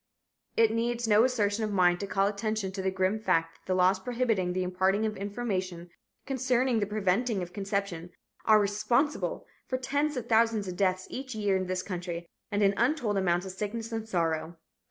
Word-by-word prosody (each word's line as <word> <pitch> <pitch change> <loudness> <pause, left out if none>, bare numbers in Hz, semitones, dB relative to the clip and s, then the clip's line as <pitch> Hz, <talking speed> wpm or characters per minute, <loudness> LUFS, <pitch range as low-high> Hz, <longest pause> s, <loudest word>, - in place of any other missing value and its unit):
It 225 -1 +5
needs 235 +1 -1
no 215 +1 +6
assertion 220 -4 +1
of 215 - -1
mine 180 -3 +3
to 200 - -4
call 195 0 +2
attention 210 -1 -1
to 190 0 -4
the 190 - +1
grim 190 +3 0
fact 165 -6 +1
that - - -36
the 185 - +1
laws 185 +1 +4
prohibiting 225 -4 0
the 185 0 0
imparting 190 +3 +1
of 215 -1 -2
information 190 -4 -3 0.3
concerning 255 -2 +1
the 205 - 0
preventing 210 +1 0
of 175 0 -9
conception 195 -3 -3 0.3
are 215 -1 +6
responsible 225 +8 0 0.2
for 255 - -1
tens 285 +3 -1
of 240 -2 -4
thousands 225 -3 +3
of 180 - -4
deaths 185 -1 +1
each 260 -2 -5
year 205 -2 +1
in 185 -1 -1
this 185 0 -2
country 175 -2 -5 0.3
and 205 0 +1
an 200 0 +4
untold 240 -4 +1
amount 180 -2 +1
of 190 - -5
sickness 215 +4 -4
and 225 -1 -4
sorrow. 165 -2 -1
205 Hz, 190 wpm, -29 LUFS, 185-230 Hz, 0.3 s, no